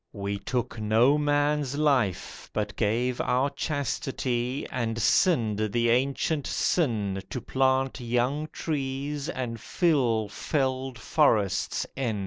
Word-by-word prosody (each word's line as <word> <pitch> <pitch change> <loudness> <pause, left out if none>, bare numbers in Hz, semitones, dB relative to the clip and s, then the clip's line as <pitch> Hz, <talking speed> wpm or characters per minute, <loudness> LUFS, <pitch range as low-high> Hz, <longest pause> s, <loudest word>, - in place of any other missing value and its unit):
We 100 0 -3
took 120 +2 -3
no 110 +6 +4
man's 145 -1 +1
life 135 - 0
but 105 -3 -2
gave 120 +3 0
our 130 +3 +1
chastity, 130 -3 -2
And 115 -2 -2
sinned 115 - +3
the 120 0 +2
ancient 140 +4 0
sin 105 - 0
To 125 - -3
plant 130 +2 +1
young 125 +5 0
trees 140 0 -3
and 120 -7 -4
fill 125 - +1
felled 130 +2 -2
forests 110 - +1
in. 120 -6 -1
125 Hz, 115 wpm, -27 LUFS, 115-140 Hz, -, no